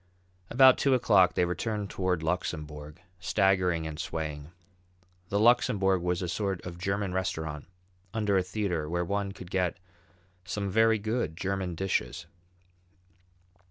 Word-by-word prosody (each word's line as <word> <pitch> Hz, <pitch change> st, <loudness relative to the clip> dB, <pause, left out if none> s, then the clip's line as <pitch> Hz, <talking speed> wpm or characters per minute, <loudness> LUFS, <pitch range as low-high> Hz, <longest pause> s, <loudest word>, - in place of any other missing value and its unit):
About 130 Hz, +1 st, +6 dB
two 135 Hz, -2 st, +3 dB
o'clock 95 Hz, -7 st, +4 dB
they 90 Hz, -, +3 dB
returned 100 Hz, +4 st, -3 dB
toward 90 Hz, -3 st, -1 dB
the -, -, -5 dB
Luxembourg, 75 Hz, -2 st, -4 dB, 0.2 s
staggering 90 Hz, -3 st, +2 dB
and 80 Hz, -1 st, -6 dB
swaying. 75 Hz, -3 st, -4 dB, 0.8 s
The 100 Hz, -, +1 dB
Luxembourg 100 Hz, -5 st, +3 dB
was 90 Hz, +1 st, -1 dB
a -, -, -2 dB
sort 95 Hz, +1 st, -2 dB
of 90 Hz, -1 st, -7 dB
German 100 Hz, 0 st, -1 dB
restaurant 80 Hz, -6 st, -3 dB, 0.4 s
under 105 Hz, -3 st, 0 dB
a 95 Hz, -, +4 dB
theatre 90 Hz, -5 st, -2 dB
where 85 Hz, +1 st, -1 dB
one 100 Hz, +1 st, -2 dB
could 95 Hz, -2 st, -11 dB
get 90 Hz, -3 st, 0 dB, 0.7 s
some 100 Hz, +1 st, -3 dB
very 110 Hz, +2 st, +4 dB
good 110 Hz, -6 st, -2 dB
German 95 Hz, -2 st, -2 dB
dishes. 85 Hz, -4 st, -2 dB
95 Hz, 135 wpm, -29 LUFS, 85-100 Hz, 0.8 s, About